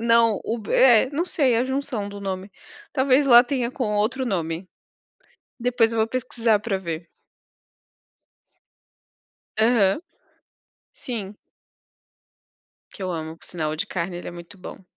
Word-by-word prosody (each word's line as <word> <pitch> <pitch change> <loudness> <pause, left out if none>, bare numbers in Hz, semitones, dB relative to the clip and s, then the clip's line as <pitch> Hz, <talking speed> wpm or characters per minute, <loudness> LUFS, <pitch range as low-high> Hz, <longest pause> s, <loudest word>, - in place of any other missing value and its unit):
Não, 230 -1 +3
o 230 - -2
b 215 - -6
é, 250 -2 +6
não 305 +4 -1
sei, 275 -9 +1
é - - +3
a 245 - +1
junção 265 -6 -3
do 200 0 -8
nome. 190 0 -4 0.4
Talvez 270 +1 +3
lá 240 -1 +8
tenha 250 -2 -1
com 235 -6 -2
outro 250 +5 0
nome. 170 -2 -3 0.9
Depois 235 -2 +2
vou 225 -1 +1
pesquisar 235 -3 0
pra 200 -2 -2
ver. 170 -2 -5 2.5
Aham. 220 -1 +3 0.9
Sim. 210 -5 -6 1.6
Que - - -10
eu 185 - -2
amo, 160 0 -5
por - - -17
sinal. 155 -3 -3
O 155 - -3
de - - -2
carne, 175 0 -3
ele - - -7
é - - -5
muito 175 +3 -11
bom. 185 +1 -10
220 Hz, 145 wpm, -23 LUFS, 190-250 Hz, 2.5 s, lá